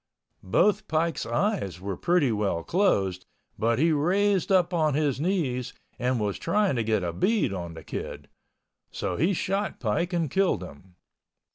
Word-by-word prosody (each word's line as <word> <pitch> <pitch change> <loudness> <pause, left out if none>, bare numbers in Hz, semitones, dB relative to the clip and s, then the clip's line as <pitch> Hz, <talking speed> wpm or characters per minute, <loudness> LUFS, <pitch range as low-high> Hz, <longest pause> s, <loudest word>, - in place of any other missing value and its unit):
Both 205 - +2
Pike's 165 +1 0
eyes 135 - -1
were 95 0 -4
pretty 170 - +2
well 100 -6 -1
closed, 100 - +1 0.3
but 115 +1 +2
he 160 +5 +3
raised 190 +6 +2
up 180 -1 +3
on 155 -4 +2
his 145 -3 0
knees 150 -9 -1 0.3
and 125 0 0
was 105 -2 -2
trying 200 -2 +1
to 115 - +1
get 110 -3 0
a 85 -1 -2
bead 195 - +1
on 85 -3 -5
the 80 - -10
Kid—so - - -8
he 180 +5 +2
shot 195 +4 -2
Pike 150 - -1
and 165 -6 -1
killed 190 - +1
him. 90 +2 -13
150 Hz, 155 wpm, -26 LUFS, -, 0.3 s, he